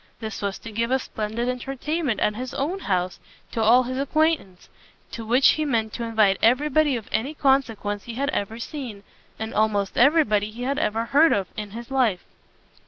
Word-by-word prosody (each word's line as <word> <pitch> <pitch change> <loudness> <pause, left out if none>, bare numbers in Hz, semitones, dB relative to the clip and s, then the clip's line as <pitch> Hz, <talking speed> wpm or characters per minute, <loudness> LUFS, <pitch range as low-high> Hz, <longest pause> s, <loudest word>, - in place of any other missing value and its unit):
This 220 -1 -6
was 200 -1 -2
to 230 - -10
give 230 +2 -1
a 260 - +3
splendid 225 -1 -4
entertainment 270 +2 -2
at 210 - +2
his 255 +2 -6
own 330 +8 -2
house 185 - -1 0.3
to 225 - -2
all 235 +4 +5
his 255 +1 -4
acquaintance, 285 - 0 0.4
to 230 - -6
which 245 +5 +4
he 310 - +2
meant 225 -7 -1
to 240 - -4
invite 215 -4 +2
every 255 +6 +3
body 295 -1 +3
of 225 -3 -6
any 255 +8 -1
consequence 225 -8 0
he 235 - -7
had 280 +3 -1
ever 220 -3 -3
seen, 235 -5 -7 0.3
and 220 0 -5
almost 205 -2 +1
every 300 +6 +6
body 210 -2 0
he 235 +3 -7
had 280 +3 -1
ever 225 -5 0
heard 300 +7 +4
of, 195 -2 0
in 210 -1 -5
his 235 +4 -9
life. 240 -9 +1
235 Hz, 195 wpm, -24 LUFS, 215-270 Hz, 0.4 s, every